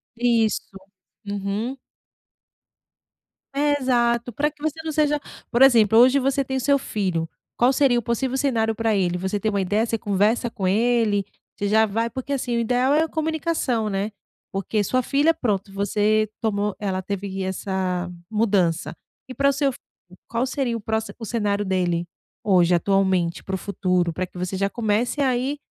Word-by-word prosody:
Isso. 230 -2 +2 0.6
Uhum. 205 +5 -3 1.8
É 290 +1 +2
exato, 240 -2 +1
pra 295 +6 0
que 295 - -26
você 315 +1 -2
não 320 - -3
seja, 295 -1 +2 0.3
por 240 - +1
exemplo: 225 -5 +6
hoje, 260 +3 +6
você 275 +1 +1
tem 265 0 -3
o - - 0
seu 280 +3 +3
filho. 185 -10 -2 0.3
Qual 250 +3 +4
seria 265 -3 +3
o 240 - +1
possível 250 +3 -1
cenário 225 -5 +1
pra 225 -1 +1
ele? 180 -2 +1
Você 190 +3 -2
tem 220 - 0
uma 200 -2 0
ideia? 205 +4 +1
Você 230 -1 -1
conversa 210 +4 +1
com 195 -6 -3
ele? 220 -1 +2 0.3
Você 205 - -2
já 220 +2 +4
vai 225 +3 -1
porque 265 +4 -4
assim, 245 -3 -1
o - - +1
ideal 250 +4 +2
é 305 - +4
a - - -1
comunicação, 315 -8 -1
né? 200 +2 -2 0.4
Porque 205 +2 -1
sua 255 +6 +1
filha, 290 +6 +2
pronto, 200 - -2
você 210 +2 +1
tomou 210 -2 -1
ela 190 -2 -2
teve 195 0 -4
essa 185 -1 -2 0.2
mudança, 200 -7 +1 0.3
e 255 - -7
pra 280 +1 +2
o - - +1
seu 280 0 +1
filho? - - -14 0.5
Qual 235 +2 0
seria 260 -3 -1
o - - -9
proxi 220 +1 -2
o 225 - -6
cenário 205 -2 -1
dele 175 -2 0 0.4
hoje, 180 -3 +4
atualmente, 190 -2 +1
para 190 - -3
o - - -2
futuro? 180 -3 0
Para 185 - -2
que 180 - -14
você 180 +2 -3
já 195 +1 0
comece 225 +5 -1
aí 260 +2 0
220 Hz, 175 wpm, -23 LUFS, 195-255 Hz, 1.8 s, exemplo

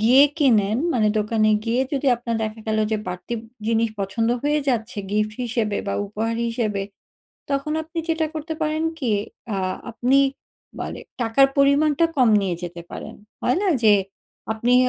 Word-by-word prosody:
গিয়ে 255 +6 +7
কিনেন 220 -7 +3 0.2
মানে 215 -3 +3
দোকানে 215 0 +2
গিয়ে 235 +2 +1
যদি 280 0 -1
আপনার 235 -1 -3
দেখা 215 +1 -4
গেলো 215 0 +1
যে - - +3
বাড়তি 180 +6 -4 0.3
জিনিস 230 0 +2
পছন্দ 225 +4 0
হয়ে 295 +1 +2
যাচ্ছে 225 -3 -1
গিফট 215 +1 0
হিসেবে 225 -3 -1
বা 200 - -1
উপহার 220 +3 -2
হিসেবে। 215 -4 -1 0.7
তখন 275 +2 -1
আপনি 325 +2 -7
যেটা 320 -1 +1
করতে 315 +1 -4
পারেন 310 +1 0 0.2
কি 255 -7 -1 0.4
আ - - -1 0.3
আপনি 250 +4 +2 0.6
মানে - - -5 0.2
টাকার 235 +4 +5
পরিমাণটা 285 +3 +4
কম 255 -3 +5
নিয়ে 190 -3 -1
যেতে 175 0 -6
পারেন - - -7 0.3
হয় 250 - +2
না 395 - +2 0.2
যে, 210 -1 +8 0.6
আপনি 235 +3 +1
230 Hz, 155 wpm, -23 LUFS, 215-275 Hz, 0.7 s, যে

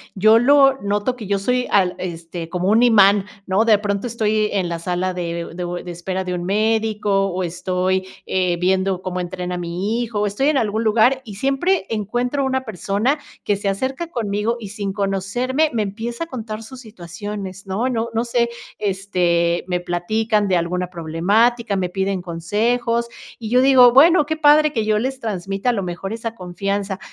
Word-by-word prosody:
Yo 215 +3 +5
lo 270 +1 +5
noto 205 +4 -1
que 225 -5 -8
yo 200 0 0
soy 250 +5 0
al 185 -3 +3
este, 165 -1 -6
como 180 +2 -1
un 225 +3 +4
imán, 205 -4 +5 0.2
¿no? 195 +4 +2
De 220 -2 +5
pronto 205 +2 -2
estoy 215 -2 0
en 185 -4 -1
la 170 - -3
sala 180 +2 -2
de 170 -1 -4
u - - -10
de 180 - -4
u 175 0 -4
de 175 0 -6
espera 185 +2 -4
de 180 -1 -3
un 175 -1 -3
médico, 210 -1 +1
o 185 -1 -3
estoy, 185 +2 -1 0.2
eh, 180 -2 0
viendo 190 +1 +1
cómo 185 -1 -4
entrena 180 0 -4
mi 180 +7 -2
hijo, 215 -3 -2
estoy 210 +9 +1
en 295 - +2
algún 220 -1 0
lugar, 230 +5 +3
y 210 -4 -9
siempre 275 - 0
encuentro 245 +6 -1
una 260 0 0
persona 220 - -1 0.2
que 205 - +1
se 200 0 -2
acerca 260 - -2
conmigo, 225 -3 -2
y 205 -3 -8
sin 200 -2 -4
conocerme, 210 +9 0
me 220 -2 +1
empieza 230 +8 -4
a - - -21
contar 225 -6 -6
sus 255 +3 -11
situaciones, 195 -1 -8
¿no? 220 +7 -1
No 235 -2 -1
no 225 +1 0
sé, 235 0 +1 0.3
este, 180 -4 0
me 180 -1 -1
platican 205 +5 0
de 185 -2 +2
alguna 180 +1 -1
problemática, 200 +7 +1
me 185 -2 -1
piden 190 0 -2
consejos, 230 +8 -1 0.3
y 220 -2 -6
yo 250 +1 +4
digo: 255 -3 +7
"Bueno, 310 +3 +6
qué 315 +2 -2
padre 305 0 +5
que 220 -3 -1
yo 215 -1 +2
les 260 +2 -3
transmita, 195 +1 -2
a - - +2
lo 200 -4 -2
mejor, 180 +3 -5
esa 230 0 -5
confianza". 195 +1 -3
205 Hz, 190 wpm, -20 LUFS, 185-235 Hz, 0.3 s, digo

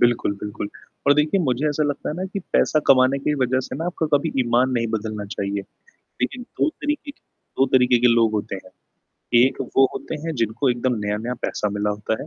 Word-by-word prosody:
बिल्कुल, 120 -4 +3
बिल्कुल 105 0 -5 0.4
और 140 - +6
देखिए 150 +6 +2
मुझे 135 -2 0
ऐसा 150 +1 0
लगता 145 -1 -2
है - - -2
ना 185 - -3
कि - - -2
पैसा 155 - +3
कमाने 130 +1 +5
की 150 +2 0
वजह 130 +1 +1
से 130 - -6
ना 160 - -3
आपका 170 -2 -1
कभी 155 +3 -2
ईमान 125 +1 +2
नहीं 120 -2 0
बदलना 110 -1 -3
चाहिए। 100 0 -2 0.6
लेकिन 250 - -1
2 275 - -1
तरीके 295 -2 -4
के - - -34 0.4
2 135 - +6
तरीके 125 -1 +5
के 125 - +6
लोग 115 -2 +3
होते 105 -2 -2
हैं। - - -16 0.7
एक 130 +2 +3 0.2
वो 135 - +7
होते - - -5
हैं 165 - -2
जिनको 115 +5 +1
एकदम 125 +1 0
नया-नया 105 +4 -2
पैसा 105 - -1
मिला 105 +1 -1
होता 105 +2 -3
है - - -9
125 Hz, 210 wpm, -22 LUFS, 110-150 Hz, 0.7 s, वो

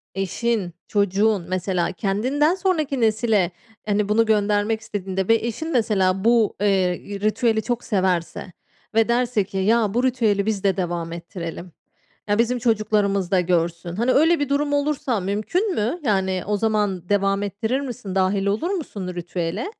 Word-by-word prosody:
eşin, 195 0 -1
çocuğun 200 -1 +1
mesela 185 -1 -1
kendinden 255 - +1
sonraki 315 -9 0
nesile 215 -4 +2 0.3
hani 210 -1 0
bunu 225 +2 +3
göndermek 210 0 +1
istediğinde 190 -3 -3
ve 225 - +5
eşin 235 +7 -3
de 330 - -4
mesela 195 -5 +1
bu, 230 -2 +3
eee, 190 -3 +2 0.2
ritüeli 220 +2 +1
çok 240 0 -3
severse 185 -3 -1 0.4
ve 225 0 +4
derse 240 -3 +1
ki, 195 0 -7
ya 210 +1 +2
bu 245 +2 +1
ritüeli 225 -6 +1
biz 215 -3 -1
de 195 -1 +2
devam 170 -2 -2
ettirelim. 170 0 -7 0.6
Ya 205 - +2
bizim 240 +1 +2
çocuklarımız 210 -5 +1
da 185 - +4
görsün. 170 -1 -1
Hani 235 +5 +1
öyle 325 +4 +4
bir 285 -1 -1
durum 290 +1 0
olursa 285 -4 0
mümkün 215 - -1
mü? 235 +12 -1
Yani 190 -6 0
o 210 0 +1
zaman 205 -4 -1
devam 195 0 +1
ettirir 220 +6 -2
misin? 240 -8 -6
Dâhil 195 +1 +1
olur 210 - 0
musun 290 - -4
ritüele? 175 - -3
210 Hz, 155 wpm, -22 LUFS, 190-235 Hz, 0.6 s, ve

